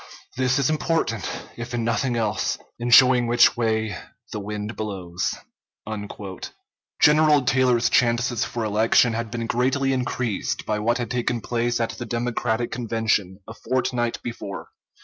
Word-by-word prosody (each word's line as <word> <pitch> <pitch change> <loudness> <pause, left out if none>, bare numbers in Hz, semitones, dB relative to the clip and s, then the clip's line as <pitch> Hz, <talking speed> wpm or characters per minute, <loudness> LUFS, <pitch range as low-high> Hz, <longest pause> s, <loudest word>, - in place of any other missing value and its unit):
This 130 +1 +1
is 140 -2 +2
important, 155 - -1 0.3
if 120 +1 -5
in 120 - -1
nothing 120 +2 0
else, 110 -2 -1 0.2
in 120 +1 -2
showing 125 0 +6
which 120 0 +5
way 110 -2 0 0.4
the 105 - -4
wind 105 +2 -5
blows." 95 -4 -3 1.6
General 150 -1 +5
Taylor's 125 -2 +3
chances 120 -1 +2
for 120 - -3
election 110 +2 +3
had 115 0 -3
been 115 0 -4
greatly 135 +3 +1
increased 125 -4 -2
by 105 0 -1
what 115 +3 +1
had 120 -3 -4
taken 120 -1 -1
place 120 +1 -1
at 115 - 0
the 120 - -7
Democratic 120 0 -1
Convention, 110 -5 -1
a - - -8
fortnight 120 -1 -1
before. 105 -5 -6
120 Hz, 140 wpm, -23 LUFS, 110-125 Hz, 1.6 s, showing